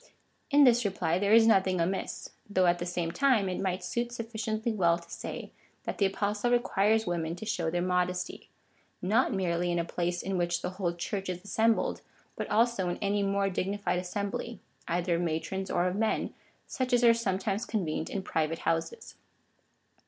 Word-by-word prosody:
In 290 Hz, -1 st, +6 dB
this 245 Hz, -2 st, +5 dB
reply 185 Hz, -4 st, 0 dB
there 200 Hz, +1 st, +1 dB
is 225 Hz, 0 st, +7 dB
nothing 190 Hz, -4 st, +3 dB
amiss, 185 Hz, +3 st, -2 dB, 0.2 s
though 185 Hz, -2 st, +3 dB
at 175 Hz, 0 st, +3 dB
the 175 Hz, -, -3 dB
same 175 Hz, -2 st, -2 dB
time 245 Hz, -3 st, +3 dB
it 180 Hz, -, -2 dB
might 185 Hz, -1 st, -1 dB
suit 235 Hz, +6 st, -2 dB
sufficiently 225 Hz, -1 st, -3 dB
well 170 Hz, -5 st, +3 dB
to 170 Hz, 0 st, -14 dB
say, -, -, -6 dB, 0.3 s
that -, -, -5 dB
the 200 Hz, -, +4 dB
Apostle 205 Hz, +4 st, -1 dB
requires 220 Hz, -2 st, +2 dB
women 170 Hz, -2 st, -2 dB
to 200 Hz, -, -8 dB
show 175 Hz, -6 st, -1 dB
their 175 Hz, +1 st, -1 dB
modesty 180 Hz, 0 st, -1 dB, 0.3 s
— -, -, -38 dB
not 220 Hz, +8 st, +3 dB
merely 175 Hz, -3 st, 0 dB
in 175 Hz, -, 0 dB
a 170 Hz, -, 0 dB
place 175 Hz, +1 st, -2 dB
in 190 Hz, -1 st, -1 dB
which 175 Hz, 0 st, 0 dB
the -, -, -2 dB
whole 185 Hz, -2 st, -2 dB
Church 195 Hz, +2 st, -3 dB
is 180 Hz, -1 st, -4 dB
assembled, 225 Hz, +2 st, +1 dB, 0.3 s
but -, -, -4 dB
also 220 Hz, -4 st, +2 dB
in 175 Hz, -, -2 dB
any 205 Hz, 0 st, 0 dB
more 200 Hz, 0 st, +1 dB
dignified 195 Hz, 0 st, -1 dB
assembly, 200 Hz, +5 st, -4 dB, 0.3 s
either 175 Hz, 0 st, 0 dB
of -, -, -1 dB
matrons 175 Hz, +3 st, -2 dB
or 175 Hz, -, +1 dB
of 180 Hz, 0 st, 0 dB
men, 220 Hz, +1 st, 0 dB, 0.3 s
such 255 Hz, -2 st, -2 dB
as 245 Hz, 0 st, +4 dB
are 235 Hz, -1 st, +8 dB
sometimes 200 Hz, -1 st, -1 dB
convened 165 Hz, -7 st, -2 dB
in 195 Hz, -, -3 dB
private 160 Hz, -2 st, -1 dB
houses. 165 Hz, -, -2 dB
190 Hz, 185 wpm, -29 LUFS, 175-220 Hz, 0.3 s, are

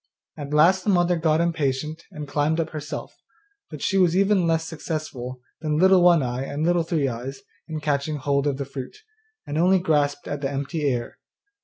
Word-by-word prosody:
At 145 Hz, -1 st, -7 dB
last 175 Hz, +5 st, +4 dB
the -, -, -1 dB
mother 175 Hz, -2 st, +3 dB
got 160 Hz, -1 st, +2 dB
impatient 155 Hz, -1 st, -1 dB
and 150 Hz, -6 st, -7 dB
climbed 150 Hz, +4 st, 0 dB
up 160 Hz, -1 st, -1 dB
herself, 155 Hz, -1 st, -6 dB, 0.5 s
but 150 Hz, -4 st, -8 dB
she 195 Hz, -, +2 dB
was 180 Hz, -1 st, +3 dB
even 195 Hz, -3 st, +3 dB
less 165 Hz, 0 st, +1 dB
successful 150 Hz, -6 st, -5 dB, 0.2 s
than 150 Hz, -1 st, -1 dB
Little 190 Hz, +2 st, +6 dB
One 175 Hz, -4 st, +5 dB
eye 125 Hz, +1 st, -2 dB
and 145 Hz, +2 st, -3 dB
Little 175 Hz, 0 st, +3 dB
Three 160 Hz, -4 st, 0 dB
eyes 130 Hz, +2 st, -5 dB, 0.3 s
in 160 Hz, -2 st, -4 dB
catching 150 Hz, 0 st, -1 dB
hold 140 Hz, 0 st, 0 dB
of 140 Hz, -2 st, 0 dB
the 140 Hz, -, -3 dB
fruit, 135 Hz, -1 st, -8 dB, 0.5 s
and 145 Hz, +2 st, -2 dB
only 185 Hz, +3 st, +5 dB
grasped 145 Hz, -5 st, 0 dB
at 145 Hz, -1 st, -4 dB
the 135 Hz, -, -1 dB
empty 140 Hz, +2 st, -2 dB
air. 120 Hz, -2 st, -3 dB
155 Hz, 190 wpm, -24 LUFS, 140-170 Hz, 0.5 s, Little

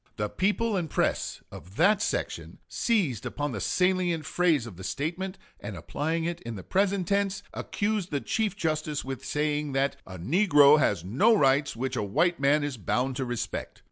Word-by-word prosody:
The 105 Hz, -1 st, -1 dB
people 210 Hz, -, 0 dB
and 175 Hz, -4 st, -1 dB
press -, -, -1 dB
of 95 Hz, +3 st, -12 dB
that 205 Hz, -, +4 dB
section -, -, -3 dB
seized 170 Hz, -, 0 dB
upon 145 Hz, -1 st, -3 dB
the 105 Hz, -5 st, -4 dB
salient 180 Hz, -, +1 dB
phrase 165 Hz, -8 st, +2 dB
of 110 Hz, -6 st, -9 dB
the 95 Hz, -, -10 dB
statement, 180 Hz, -, -3 dB, 0.2 s
and 100 Hz, -2 st, -7 dB
applying 160 Hz, -, -2 dB
it 170 Hz, 0 st, -3 dB
in 115 Hz, -1 st, -6 dB
the 95 Hz, -, -8 dB
present 195 Hz, -2 st, +1 dB
tense, 200 Hz, -1 st, 0 dB
accused 205 Hz, -3 st, -2 dB
the 145 Hz, -, -1 dB
Chief 210 Hz, -, -1 dB
Justice 155 Hz, -6 st, -2 dB
with 135 Hz, 0 st, -5 dB
saying 150 Hz, 0 st, -1 dB
that 135 Hz, +1 st, 0 dB
"a 95 Hz, -1 st, -8 dB
negro 150 Hz, -, +5 dB
has 85 Hz, -, +1 dB
no 205 Hz, -, +4 dB
rights 140 Hz, -2 st, +3 dB
which 130 Hz, +2 st, -3 dB
a -, -, 0 dB
white 160 Hz, -, +1 dB
man 145 Hz, +2 st, +3 dB
is 145 Hz, -3 st, -3 dB
bound 125 Hz, +6 st, -1 dB
to 130 Hz, -, -1 dB
respect." 120 Hz, -2 st, -4 dB
150 Hz, 180 wpm, -27 LUFS, 130-185 Hz, 0.2 s, negro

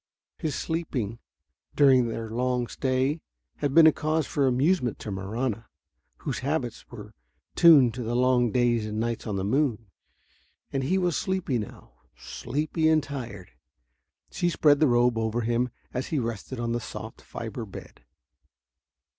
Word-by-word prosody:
His 155 Hz, -4 st, -2 dB
sleeping, 130 Hz, -10 st, -3 dB, 0.6 s
during 130 Hz, -4 st, +5 dB
their 115 Hz, -1 st, -5 dB
long 125 Hz, +1 st, 0 dB
stay, 130 Hz, +5 st, -1 dB, 0.4 s
had 140 Hz, -2 st, -2 dB
been 165 Hz, -1 st, +9 dB
a 160 Hz, -, +8 dB
cause 155 Hz, 0 st, -1 dB
for 140 Hz, 0 st, +1 dB
amusement 130 Hz, -, +1 dB
to 105 Hz, -, -7 dB
Marahna, 110 Hz, +4 st, -3 dB, 0.6 s
whose -, -, -3 dB
habits -, -, -3 dB
were -, -, -10 dB, 0.4 s
tuned 145 Hz, -9 st, +7 dB
to 125 Hz, -, -5 dB
the 120 Hz, 0 st, -2 dB
long 125 Hz, -2 st, +3 dB
days 120 Hz, -2 st, +2 dB
and 105 Hz, 0 st, -3 dB
nights 115 Hz, 0 st, -2 dB
on 105 Hz, -, -2 dB
the 95 Hz, -, -2 dB
moon. 115 Hz, -3 st, 0 dB, 0.8 s
And 135 Hz, -1 st, 0 dB
he 185 Hz, +7 st, +1 dB
was 180 Hz, -3 st, +1 dB
sleepy 185 Hz, -10 st, -1 dB
now, 105 Hz, -, -9 dB, 0.3 s
sleepy 155 Hz, +5 st, -1 dB
and 155 Hz, -2 st, +3 dB
tired. 120 Hz, -9 st, -7 dB, 0.8 s
She 175 Hz, -, 0 dB
spread 150 Hz, -3 st, +4 dB
the 155 Hz, -, +5 dB
robe 120 Hz, -1 st, +3 dB
over 110 Hz, +1 st, -1 dB
him 120 Hz, +2 st, 0 dB, 0.2 s
as 130 Hz, +2 st, -3 dB
he 160 Hz, -, -2 dB
rested 115 Hz, 0 st, -4 dB
on 115 Hz, 0 st, -2 dB
the 120 Hz, -, 0 dB
soft -, -, -8 dB
fiber -, -, -6 dB
bed. -, -, -11 dB
125 Hz, 155 wpm, -26 LUFS, 115-150 Hz, 0.8 s, been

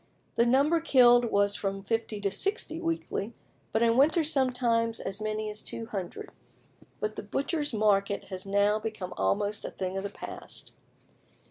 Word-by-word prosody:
The 235 Hz, +1 st, +3 dB
number 280 Hz, +7 st, +4 dB
killed 245 Hz, -6 st, +6 dB
was 200 Hz, -2 st, +2 dB
from 195 Hz, -1 st, -3 dB
50 225 Hz, 0 st, -2 dB
to 200 Hz, -1 st, 0 dB
60 335 Hz, -, -1 dB
weekly 325 Hz, -, -2 dB, 0.4 s
but 220 Hz, -, +2 dB
in 230 Hz, 0 st, +4 dB
winter 315 Hz, +5 st, +5 dB
sometimes 245 Hz, -5 st, +1 dB
as 195 Hz, +2 st, -5 dB
many 215 Hz, 0 st, -2 dB
as 210 Hz, -, -8 dB
200. 225 Hz, -, -6 dB, 0.7 s
But 215 Hz, 0 st, -3 dB
the -, -, -3 dB
butchers' 290 Hz, -, -2 dB
market 200 Hz, -2 st, +2 dB
has 185 Hz, -1 st, -5 dB
now 200 Hz, +2 st, +2 dB
become 215 Hz, -4 st, -5 dB
almost 205 Hz, +1 st, 0 dB
a -, -, -4 dB
thing 190 Hz, 0 st, -4 dB
of 195 Hz, -, -3 dB
the 200 Hz, -, -3 dB
past. -, -, -6 dB
220 Hz, 155 wpm, -29 LUFS, 200-255 Hz, 0.7 s, killed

